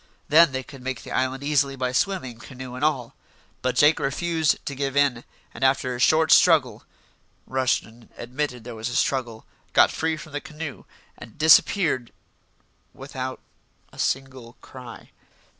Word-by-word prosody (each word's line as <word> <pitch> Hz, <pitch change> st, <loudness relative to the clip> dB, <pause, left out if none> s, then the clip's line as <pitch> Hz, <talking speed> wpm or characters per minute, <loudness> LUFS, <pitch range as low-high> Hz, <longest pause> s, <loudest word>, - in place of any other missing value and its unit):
Then 160 Hz, +1 st, +6 dB
they 130 Hz, 0 st, -3 dB
could 135 Hz, 0 st, -13 dB
make 130 Hz, -1 st, -5 dB
the -, -, -10 dB
island 130 Hz, +1 st, -1 dB
easily 140 Hz, -2 st, +1 dB
by 130 Hz, -1 st, -2 dB
swimming, 130 Hz, -, -1 dB
canoe 130 Hz, 0 st, -9 dB
and 125 Hz, +3 st, -6 dB
all. 135 Hz, -6 st, 0 dB, 0.5 s
But 130 Hz, 0 st, -1 dB
Jake 150 Hz, +2 st, +5 dB
refused 160 Hz, +2 st, 0 dB
to 140 Hz, -, -4 dB
give 140 Hz, 0 st, -3 dB
in, 135 Hz, -4 st, +2 dB, 0.3 s
and -, -, -6 dB
after 130 Hz, -1 st, +2 dB
a -, -, -7 dB
short 155 Hz, +4 st, +3 dB
struggle -, -, +4 dB, 0.6 s
Rushton 125 Hz, -3 st, -2 dB
admitted 125 Hz, 0 st, -4 dB
there 120 Hz, +1 st, -8 dB
was 110 Hz, +1 st, -4 dB
a 120 Hz, -, -5 dB
struggle 120 Hz, -5 st, -1 dB, 0.3 s
got -, -, +5 dB
free 160 Hz, 0 st, -1 dB
from 155 Hz, 0 st, -11 dB
the 145 Hz, 0 st, -4 dB
canoe 155 Hz, -3 st, -8 dB, 0.3 s
and -, -, -12 dB
disappeared 160 Hz, -, +4 dB, 0.8 s
without 130 Hz, -1 st, -6 dB, 0.5 s
a -, -, -14 dB
single 130 Hz, -3 st, -3 dB
cry. 125 Hz, -2 st, -12 dB
130 Hz, 155 wpm, -24 LUFS, 125-150 Hz, 0.8 s, Then